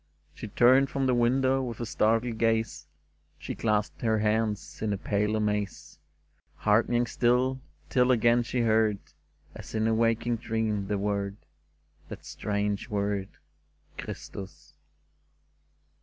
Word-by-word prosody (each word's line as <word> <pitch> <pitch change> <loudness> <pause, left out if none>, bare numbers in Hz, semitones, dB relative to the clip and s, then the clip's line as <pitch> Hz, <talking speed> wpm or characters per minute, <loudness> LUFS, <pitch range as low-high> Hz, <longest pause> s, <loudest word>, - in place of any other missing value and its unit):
She 115 - -8
turned 130 +5 +4
from 135 -1 -1
the 130 - +2
window 130 +2 +2
with 120 -4 -5
a 120 - -3
startled 115 +1 +1
gaze: 115 -7 0 0.5
She - - -6
clasped 105 -2 -1
her 110 -2 +2
hands 105 0 -1
in 110 -2 0
a - - -2
pale 105 +2 0
amaze, 105 -2 -2 0.6
Hearkening 115 +3 +2
still, 125 +2 +1 0.3
till 125 0 +2
again 120 0 +4
she 120 +1 -2
heard. 110 -2 +3 0.6
As - - -9
in 110 0 +1
a 115 - +2
waking 115 +1 +1
dream, 110 -3 -2
the 105 - -1
word 100 0 -2 0.4
— 75 0 -34
That - - -9
strange 105 +1 -2
word, 100 -2 -1 0.4
" - - -37
Christus 95 -1 -8
110 Hz, 135 wpm, -28 LUFS, 105-120 Hz, 0.6 s, turned